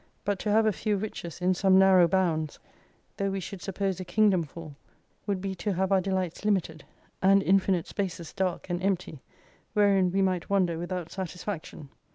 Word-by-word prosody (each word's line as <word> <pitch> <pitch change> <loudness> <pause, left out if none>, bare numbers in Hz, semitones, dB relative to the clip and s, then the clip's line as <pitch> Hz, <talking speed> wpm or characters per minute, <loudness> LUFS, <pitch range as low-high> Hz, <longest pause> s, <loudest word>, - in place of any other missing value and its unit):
But 200 -2 0
to 210 - -1
have 220 +1 +4
a 215 - +4
few 210 +1 -1
riches 190 -4 -6
in 185 +1 +3
some 190 +1 +4
narrow 190 -2 +6
bounds, 165 -4 0 0.6
though 200 0 0
we 195 0 -2
should 185 0 -7
suppose 195 -1 -2
a - - -4
kingdom 195 0 +3
full, 155 -1 -9 0.5
would 195 -2 -1
be 195 0 -3
to 190 +3 -2
have 190 +2 -1
our 190 -1 +4
delights 185 -2 -2
limited, 185 -7 0 0.4
and 195 +1 +5
infinite 190 -2 +2
spaces 180 -4 -4
dark 185 -3 -2
and 175 +1 -2
empty, 185 -7 -2 0.5
wherein 195 -3 +3
we 195 +1 +2
might 185 -2 -1
wander 180 -4 +1
without 175 -1 -4
satisfaction. 180 -5 -6
190 Hz, 180 wpm, -28 LUFS, 175-195 Hz, 0.6 s, narrow